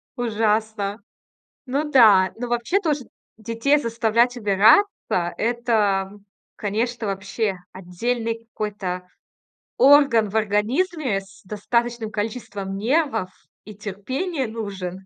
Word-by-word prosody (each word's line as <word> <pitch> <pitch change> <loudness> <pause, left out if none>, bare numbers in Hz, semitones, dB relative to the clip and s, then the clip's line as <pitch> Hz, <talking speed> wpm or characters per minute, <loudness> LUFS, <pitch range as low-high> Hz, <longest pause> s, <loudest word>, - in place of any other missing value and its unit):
Ужасно. 215 -3 -1 0.7
Ну 290 +4 -2
да, 205 -8 +6
но 245 +1 -5
вообще 240 - 0
тоже 295 -7 -1 0.3
детей 230 +7 +1
заставлять 235 0 +1
убираться- 215 - +5 0.5
это, 215 -5 0 0.4
конечно, 225 +2 -2
вообще 195 +1 -2 0.2
отдельный 230 +5 -3
какой-то 185 -4 -4 0.7
орган 270 -6 +5
в 215 - -9
организме, 220 - 0
с 195 +1 -18
достаточным 230 +3 -2
количеством 205 -3 -4
нервов 230 - 0 0.4
и 210 -2 -10
терпения 255 - -3
нужен. 195 -4 -6
220 Hz, 95 wpm, -22 LUFS, 200-245 Hz, 0.7 s, да